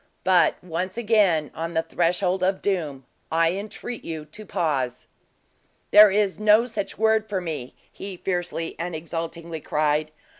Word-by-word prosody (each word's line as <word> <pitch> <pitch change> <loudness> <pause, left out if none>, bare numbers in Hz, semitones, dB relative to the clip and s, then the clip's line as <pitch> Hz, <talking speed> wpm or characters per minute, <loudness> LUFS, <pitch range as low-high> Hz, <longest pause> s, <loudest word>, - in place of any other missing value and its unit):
But, 185 -1 +4
once 180 +4 -4
again, 205 -10 +2
on 165 +1 -5
the 160 - +2
threshold 180 +3 0
of 190 +1 +1
doom, 155 -9 -2 0.3
I 165 +1 +3
entreat 215 +5 -6
you 160 -2 -5
to 205 +8 -12
pause." 135 -9 -1 0.9
"There 210 0 +9
is 200 0 +1
no 215 +2 +5
such 220 -5 -4
word 220 0 +2
for 195 -3 -1
me!" 155 -8 -5 0.2
he 195 -2 -8
fiercely 175 -3 -3
and 170 0 -3
exultingly 165 0 -5
cried. 150 +1 0
175 Hz, 145 wpm, -24 LUFS, 160-200 Hz, 0.9 s, There